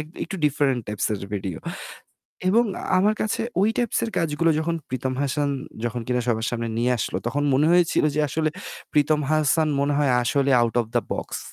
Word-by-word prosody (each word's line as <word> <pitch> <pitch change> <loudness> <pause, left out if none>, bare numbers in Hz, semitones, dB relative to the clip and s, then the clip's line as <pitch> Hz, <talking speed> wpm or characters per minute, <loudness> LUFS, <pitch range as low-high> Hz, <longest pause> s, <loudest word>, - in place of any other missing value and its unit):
এক 150 - -6 0.2
একটু 195 - -6
different 135 -3 +1
types 105 -1 -2
এর - - -5 0.2
ভিডিও। 95 -4 -4 0.9
এবং 230 +5 +4 0.3
আমার 210 +3 +3
কাছে 215 - -1 0.2
ওই 205 - +4
টাইপস 240 -3 0
এর 225 - -3
কাজগুলো 165 0 +1
যখন 165 +1 -1
প্রীতম 130 0 -2
হাসান 145 +1 0 0.4
যখন 120 +1 -2
কিনা 125 0 0
সবার 110 -2 0
সামনে 115 -1 -3
নিয়ে 125 +1 +1
আসলো - - -2
তখন 140 +4 0
মনে 150 +4 +3
হয়েছিল 175 -3 +3
যে 150 - +1
আসলে 155 +2 0 0.4
প্রীতম 150 +1 +3
হাসান 155 +1 +3
মনে 145 +1 +1
হয় 145 -3 +2
আসলে 140 +3 +1
আউট 120 -1 +1
ওফ 115 - -3
দা - - +4
বক্স। - - -4
145 Hz, 185 wpm, -24 LUFS, 125-160 Hz, 0.9 s, এবং